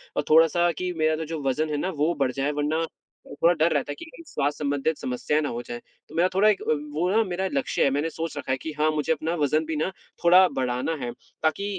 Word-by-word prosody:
और - - +1
थोड़ा-सा 165 +2 +5
कि 180 +3 -3
मेरा 155 0 +2
तो 160 +1 -4
जो 160 -1 -5
वज़न 155 +4 0
है 150 - -1
ना, 180 - -1
वो 160 -1 0
बढ़ 130 -2 +2
जाए। 135 +2 -1
वरना 150 +3 0 0.4
अ, - - -15
थोड़ा 170 - +6
डर 160 0 +2
रहता 145 0 -1
है - - -5
कि - - -8
कहीं 335 +1 -13
स्वास्थ्य 145 - -2
संबंधित 145 +2 0
समस्याएँ 130 +4 -1
ना 145 - -1
हो 120 +1 -4
जाएँ। 120 0 -7 0.3
तो - - -12
मेरा 175 +2 +4
थोड़ा 205 +3 +5
एक 205 - +1
अ, - - +1 0.2
वो 175 +4 0
ना 225 +2 +4
मेरा 190 0 -2
लक्ष्य 140 - 0
है। - - +4
मैंने 145 +4 0
सोच 165 0 -5
रखा - - -3
है 130 - +1
कि 160 - -6
हाँ, 155 +1 +3
मुझे 150 +1 0
अपना 160 +1 -2
वज़न 155 +1 +1
भी 160 0 -3
ना, 155 +4 0 0.3
थोड़ा 180 +2 +7
बढ़ाना 125 +3 -1
है, 120 -1 -3 0.3
ताकि 160 +6 +1
155 Hz, 260 wpm, -25 LUFS, 145-170 Hz, 0.4 s, थोड़ा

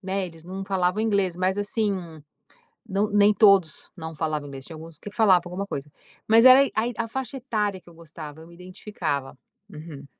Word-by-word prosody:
né, 195 0 -2
eles 165 -2 -13
não 190 +2 -6
falavam 190 +1 0
inglês, 200 -5 +1
mas, 185 +2 0
assim, 210 +1 0 1.0
nã 205 0 0
nem 205 0 +5
todos 200 -8 +3
não 160 -2 -7
falavam 155 -2 -3
inglês, 135 -1 -9
tinha 165 - -9
alguns 160 0 -11
que 205 - -9
falavam 195 -6 +4
alguma 180 +3 -4
coisa. 145 -3 -6 0.4
Mas 225 +1 +6
era 255 +1 +10
aí 275 - +3
Ai, 230 +3 0
a 230 -1 -2
faixa 265 +3 -5
etária 210 -6 -2
que 175 - -19
eu - - -16
gostava, 160 -2 -11
eu 160 - -13
me 170 - -16
identificava 175 -7 -5 0.3
uhum. 150 -4 -10
185 Hz, 195 wpm, -25 LUFS, 160-210 Hz, 1.0 s, era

